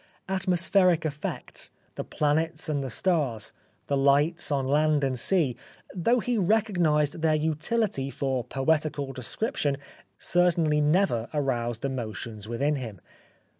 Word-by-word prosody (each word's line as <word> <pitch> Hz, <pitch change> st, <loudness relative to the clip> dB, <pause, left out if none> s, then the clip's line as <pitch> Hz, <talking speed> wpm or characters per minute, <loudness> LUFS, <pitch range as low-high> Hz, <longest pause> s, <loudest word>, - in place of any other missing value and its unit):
Atmospheric 185 Hz, -2 st, +2 dB
effects, 150 Hz, -1 st, -4 dB, 0.2 s
the -, -, -4 dB
planets 155 Hz, +2 st, 0 dB
and 145 Hz, -3 st, -1 dB
the 135 Hz, -, -4 dB
stars, 135 Hz, -, 0 dB, 0.3 s
the 140 Hz, -, 0 dB
lights 145 Hz, +5 st, +2 dB
on 135 Hz, -2 st, +1 dB
land 150 Hz, +1 st, +2 dB
and 130 Hz, -2 st, 0 dB
sea, 155 Hz, -6 st, +2 dB, 0.4 s
though 230 Hz, +7 st, +2 dB
he 240 Hz, 0 st, 0 dB
recognised 175 Hz, -7 st, +2 dB
their 160 Hz, -1 st, +3 dB
utility 155 Hz, -, -1 dB
for 135 Hz, -3 st, -2 dB
poetical 145 Hz, +1 st, -1 dB
description, 145 Hz, -, -2 dB, 0.4 s
certainly 170 Hz, -4 st, +2 dB
never 150 Hz, -, +2 dB
aroused 120 Hz, -4 st, -1 dB
emotions 115 Hz, -4 st, -4 dB
within 140 Hz, +6 st, 0 dB
him. 115 Hz, -8 st, -7 dB
150 Hz, 120 wpm, -27 LUFS, 135-170 Hz, 0.4 s, their